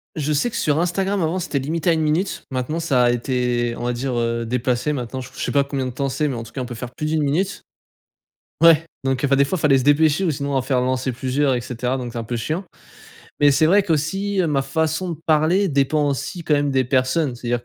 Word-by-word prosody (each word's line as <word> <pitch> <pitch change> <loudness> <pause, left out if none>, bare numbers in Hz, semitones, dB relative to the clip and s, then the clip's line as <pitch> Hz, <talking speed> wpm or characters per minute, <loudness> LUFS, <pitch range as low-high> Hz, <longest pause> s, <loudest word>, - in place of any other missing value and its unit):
Je 155 -1 -2
sais 150 +12 +1
que 230 - -7
sur 150 -6 +1
Instagram 190 +3 0
à - - +1
un - - +2
moment, 170 +4 -1
c'était 160 -5 -2
limité 160 +6 -1
à 170 - +5
1 160 - 0
minute. 160 +6 -1
Maintenant 130 +5 -2
ça 140 -7 +2
a 120 - +4
été 120 -1 -1
on - - -5
va 125 - 0
dire, 130 +2 -3
heu, 115 0 -1
déplacé, 125 +4 -1
maintenant, 130 0 -4
j 125 - -9
je - - -7
sais - - -2
pas 140 -1 +3
combien 135 -2 -3
de - - -4
temps 140 +3 -2
c'est 150 +3 -1
mais 135 - -2
en 115 - -5
tout 115 - -13
cas 130 - -5
on 125 - -4
peut 120 - -7
faire 120 +1 -7
plus 150 - -3
d'1 155 0 +1
minute 170 +8 -1 1.0
ouais, 165 -1 +6 0.2
donc, 135 -1 -1
enfin, 135 0 +3
des 140 - +4
fois 185 +7 -1
fallait 145 -4 +3
se 130 - -2
dépêcher 150 +4 +3
ou 180 - +2
sinon 140 0 -3
en 135 - +2
faire 130 0 0
lancer 130 +1 -1
plusieurs 130 +2 0
et 120 - -2
cetera 125 +2 -3
donc 120 -2 -6
c'est - - -5
un - - -4
peu 120 +2 -4
chiant. 155 - -3 0.8
Mais 145 - +6
c'est 140 +3 +3
vrai 200 +5 +5
qu'aussi 190 +5 -1
ma 140 -3 +1
façon 160 +5 -1
de 165 - -4
parler 160 +6 +3
dépend 145 +1 +1
aussi 140 +6 -4
quand 150 - +2
même 145 0 +1
des 130 -1 +2
personnes. 130 +2 +1
C'est-à-dire 120 0 -3
140 Hz, 260 wpm, -21 LUFS, 125-160 Hz, 1.0 s, ouais